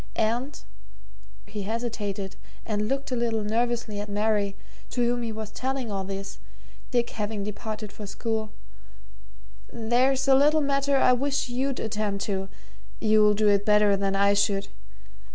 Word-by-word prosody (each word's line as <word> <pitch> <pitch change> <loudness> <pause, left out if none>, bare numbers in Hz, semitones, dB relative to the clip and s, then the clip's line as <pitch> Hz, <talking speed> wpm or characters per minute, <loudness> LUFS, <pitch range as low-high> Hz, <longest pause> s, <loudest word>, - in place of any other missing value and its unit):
And" 240 +6 0 0.9
here - - -19
he 210 - -3
hesitated 205 -3 -3 0.3
and 210 -1 -1
looked 270 +2 -2
a - - +1
little 230 -2 0
nervously 230 -1 -1
at 205 0 -5
Mary, 205 -1 +1 0.3
to 245 -1 +1
whom 240 0 +1
he 230 -1 -2
was 215 -1 -6
telling 260 -1 -3
all 195 -1 -2
this, 195 +1 -6 0.5
Dick 240 -1 +1
having 210 -1 -3
departed 210 +1 -5
for 210 - -8
school 220 +1 -3 1.2
"there's 255 +4 +2
a 270 - +7
little 295 +3 +5
matter 275 0 +2
I 255 - +5
wish 275 +1 0
you'd 260 +2 -1
attend 210 -2 -2
to 195 -2 -2 0.5
you'll 215 -1 +5
do 210 0 +2
it 200 0 +3
better 210 -1 +4
than 195 0 0
I 200 +1 +4
should. 200 -1 +1
220 Hz, 150 wpm, -26 LUFS, 205-245 Hz, 1.2 s, a